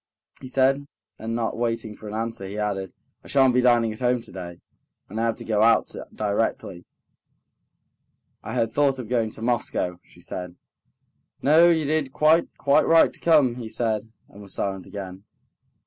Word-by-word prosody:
he - - -8
said, 135 +2 +1 0.3
and 115 +1 -4
not 115 -1 -2
waiting 115 -2 -2
for 110 - -11
an 105 - -6
answer, 115 -3 -4
he 100 +2 -7
added: 100 -3 -2 0.3
"I - - -14
shan't 135 -2 +4
be 125 - +3
dining 120 -3 +3
at 110 - -11
home 125 -1 +1
today, 90 -6 -9 0.5
and 110 +3 -4
I - - +1
have 115 - +1
got - - -25
to - - -9
go 105 -2 +1
out 115 0 +4 0.2
directly." 100 -4 -2 1.6
"I - - -6
had 115 -1 0
thought 140 +1 +2
of 125 -4 -6
going 115 -3 +1
to 110 - -10
Moscow," 110 -7 -1
she - - -21
said. 90 0 -7 0.9
"No, 160 +4 +6
you 160 -3 +2
did 150 -2 0
quite, 155 +4 +3
quite 140 0 +3
right 165 0 +5
to - - -12
come," 145 -8 +3
he 115 -3 -6
said, 110 -2 -1 0.3
and 100 - -14
was 100 -1 -9
silent 95 -2 -3
again. 95 -1 -8
115 Hz, 180 wpm, -24 LUFS, 105-130 Hz, 1.6 s, No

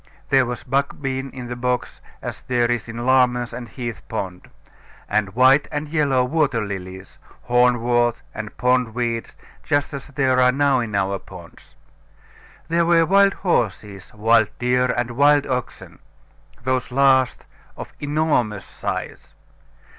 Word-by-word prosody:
There 130 -2 +4
was 120 0 -5
buck 140 +2 -1
bean 135 -1 -3
in 125 -1 -8
the 120 0 -5
bogs, 125 0 -2 0.2
as - - -6
there 120 -1 0
is 120 -1 -2
in 120 +1 -5
Larmer's 125 -2 +2
and 120 -1 -7
Heath 120 -4 -6
pond; 90 -2 -5 0.6
and 100 -2 -1
white 130 +3 +5
and 150 0 -4
yellow 145 -5 +2
water 135 -6 0
lilies, 95 -1 -8 0.2
horn 125 -1 +3
wort, 120 0 +1
and 110 0 -7
pond 125 -2 +1
weeds, 115 -2 -3 0.2
just 145 -1 -1
as 140 -1 -6
there 130 -2 +1
are 125 0 +5
now 140 0 +2
in 110 -4 -3
our 100 0 0
ponds. 85 -3 -14 0.9
There 170 +1 +2
were 165 -1 +4
wild 195 +3 +4
horses, 105 - -2
wild 110 0 +3
deer, 125 +1 +1
and 120 -1 -1
wild 145 +3 +4
oxen, 125 -2 -5 0.6
those 130 0 -1
last 130 0 +2 0.3
of - - -7
an - - -27
enormous 145 -10 0
size. - - -6
125 Hz, 145 wpm, -21 LUFS, 115-135 Hz, 0.9 s, white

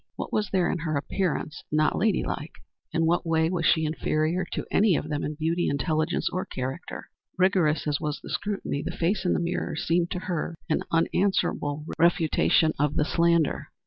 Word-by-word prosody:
What - - -6
was 210 -1 0
there 185 -3 +2
in 180 - -2
her 155 -2 -1
appearance 155 -1 -2
not 155 0 +2
lady 210 -1 +2
like? 150 - -4 0.4
In 165 -1 +1
what 170 +2 +2
way 160 0 +1
was 170 -3 +1
she 160 - +4
the - - 0
inferior 160 +4 0
of - - -2
any 200 -4 +4
of - - -3
them 145 -1 -2
in 150 - -3
beauty, 165 +3 0
intelligence 155 +3 0
or 185 - -1
character? 130 +1 -6 0.3
Rigorous 180 -5 +2
as 145 -2 -1
was 150 -1 -2
the - - -9
scrutiny, 200 -8 -2
the - - -4
face 185 +4 0
in 175 - +3
the - - +1
mirror 170 -1 -2
seemed 170 +2 +1
to 180 - -3
her 170 -2 -3
an 155 - +1
unanswerable 165 -4 +1
refutation 165 -1 +3
of 150 0 +1
the 150 - +2
slander. 170 -2 +2
165 Hz, 190 wpm, -26 LUFS, 155-180 Hz, 0.4 s, she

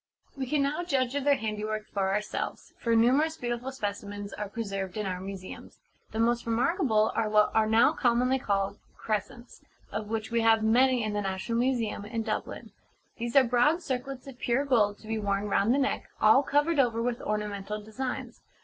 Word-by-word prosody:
We 265 -2 -4
can 295 +1 +1
now 295 +5 -1
judge 265 -6 0
of 285 -1 -2
their 285 -1 +5
handiwork 215 0 -3
for 195 -1 0
ourselves; 210 +1 -3
for 230 -1 +1
numerous 275 +8 +3
beautiful 240 0 -3
specimens 205 -4 -5
are 210 -1 -5
preserved 195 -3 -4
in 210 - -2
our 185 -1 -3
museums. 190 -1 -9 0.3
The - - -7
most 235 +1 +1
remarkable 230 - +2
are 215 - 0
what 210 0 +4
are 220 -1 +3
now 225 +2 +5
commonly 250 +2 +2
called 200 -3 -1 0.2
'Crescents,' 220 +3 -4 0.3
of 210 +1 -4
which 220 0 -3
we 235 0 +2
have 225 -1 +4
many 250 +2 +4
in 215 -1 -2
the 205 - -1
National 195 +4 -2
Museum, 240 -5 0
in 225 +2 -3
Dublin. 215 -1 -4 0.5
These 235 +2 -4
are 275 - +8
broad 255 +8 +2
circlets 260 -1 -4
of 265 -3 -11
pure 255 +4 +1
gold 210 -7 +2
to 215 - -13
be 220 0 -2
worn 200 0 -1
round 205 +2 +2
the 265 - +3
neck, 275 -1 -1
all 220 +5 +6
covered 290 +2 +1
over 235 -4 +2
with 240 +1 -1
ornamental 210 0 -3
designs. 250 +5 -5
225 Hz, 185 wpm, -28 LUFS, 210-255 Hz, 0.5 s, are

